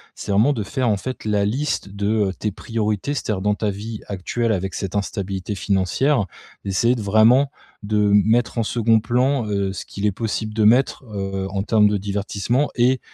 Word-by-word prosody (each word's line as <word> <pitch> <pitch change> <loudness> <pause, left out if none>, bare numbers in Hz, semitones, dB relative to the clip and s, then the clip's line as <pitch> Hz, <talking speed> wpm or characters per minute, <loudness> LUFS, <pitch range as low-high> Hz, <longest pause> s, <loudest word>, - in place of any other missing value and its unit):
c'est 100 - -5
vraiment 110 +9 +4
de 110 -6 -3
faire, 125 +4 -1
en 105 - +2
fait 130 +4 -6
la 105 -2 +1
liste 130 0 -1
de, 100 +1 -3 0.2
heu, - - -4
tes 105 +2 -3
priorités. 110 +4 -2
C'est-à-dire 105 -8 -2
dans 105 +1 +2
ta 105 0 -1
vie 105 +2 -6
actuelle 110 +4 -2
avec 95 -2 -2
cette 95 -1 -4
instabilité 100 -1 -3
financière, 100 - +1 0.4
d'essayer 110 +6 +2
de 120 - -4
vraiment, 110 +7 +4 0.3
de 105 0 +1
m 105 - +6
mettre 115 0 +1
en 115 - +2
2d 115 0 +2
plan, 125 +3 +1
heu, 100 -2 -1
ce 95 - -6
qu'il 100 - -5
est 105 - +3
possible 110 +1 -3
de 110 0 +1
mettre, 125 +6 +3
heu, 95 -1 -3
en 95 0 -2
termes 105 -1 +4
de 105 - +1
divertissement 100 +6 -1
et 125 +1 +3
105 Hz, 195 wpm, -21 LUFS, 100-115 Hz, 0.4 s, m